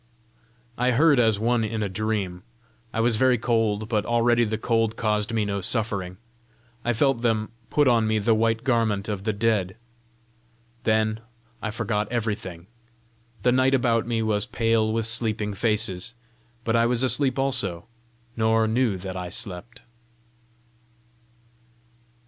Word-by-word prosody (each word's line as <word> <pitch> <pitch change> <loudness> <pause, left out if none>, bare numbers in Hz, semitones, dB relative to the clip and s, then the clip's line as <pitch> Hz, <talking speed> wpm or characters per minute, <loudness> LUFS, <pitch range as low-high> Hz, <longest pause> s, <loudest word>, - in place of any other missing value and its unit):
I 125 +1 +2
heard 145 +1 +4
as 110 -3 +3
one 115 +2 +1
in 110 0 -2
a - - -1
dream. 95 -2 -2 0.5
I - - -3
was 115 -1 +2
very 130 +1 +4
cold, 110 -2 0
but 110 -2 0
already 120 +1 +2
the 110 0 -2
cold 115 -1 0
caused 105 -1 0
me 110 -2 0
no 100 -1 -2
suffering. 100 -4 -2 0.7
I 120 - +1
felt 120 +1 +1
them 110 -2 0 0.2
put 145 -2 +3
on 115 -3 +3
me 110 0 +1
the 110 +2 +2
white 115 +1 +1
garment 115 -5 +1
of 100 -2 -4
the 110 - +2
dead. 100 -3 0 1.1
Then 110 0 +1 0.4
I 110 - -2
forgot 105 -1 -2
everything. 105 -7 -3 0.8
The 125 - +4
night 130 +2 +3
about 115 -3 +1
me 115 -1 0
was 105 -2 0
pale 115 -1 +1
with 115 0 -1
sleeping 110 -2 -1
faces, 105 0 -2 0.5
but 115 0 0
I 115 0 +4
was 125 +1 +1
asleep 130 0 +1
also, 125 -10 0 0.5
nor 110 0 +2
knew 115 -3 +1
that 95 0 -6
I 90 -1 -5
slept. 100 +6 -7
110 Hz, 145 wpm, -25 LUFS, 105-120 Hz, 1.1 s, heard